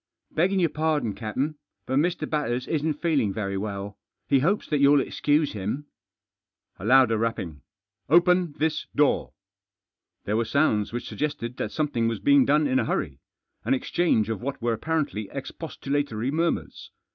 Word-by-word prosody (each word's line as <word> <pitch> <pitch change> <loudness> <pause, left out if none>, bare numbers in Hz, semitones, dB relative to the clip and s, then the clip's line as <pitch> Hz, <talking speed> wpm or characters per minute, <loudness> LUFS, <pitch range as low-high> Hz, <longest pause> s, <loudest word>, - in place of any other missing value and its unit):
"Beggin' 190 +4 +2
your 170 -3 +2
pardon, 150 -8 0
captain, 130 +9 -3 0.3
but 130 - -1
Mr. 160 -1 0
Batters 130 -5 -1
isn't 155 -1 0
feeling 140 - +2
very 100 -1 -3
well. 100 0 -5 0.3
He 140 - +4
hopes 190 +10 +1
that 150 - 0
you'll 140 +1 +6
excuse 150 +2 +1
him." 105 +8 -3 0.9
v 95 - -7
A - - -1
louder 125 -3 +5
rapping. 95 - -3 0.2
" 100 +2 -45
Open 180 -2 +3
this 155 0 -1
door." 145 -1 +2 0.9
There 105 +2 0
were 115 - +2
sounds 110 -5 +1
which 120 +1 -4
suggested 145 -5 -3
that - - -3
something 145 -7 0
was 115 -2 -2
being 140 +6 +5
done 150 +2 +3
in 130 -2 +2
a - - 0
hurry; - - -2 0.4
an - - +2
exchange 130 -5 +1
of 110 -1 -3
what 135 +2 -4
were 120 0 0
apparently 115 -5 -2
expostulatory 140 -4 -3
murmurs. 165 +2 -2
135 Hz, 160 wpm, -25 LUFS, 110-155 Hz, 0.9 s, you'll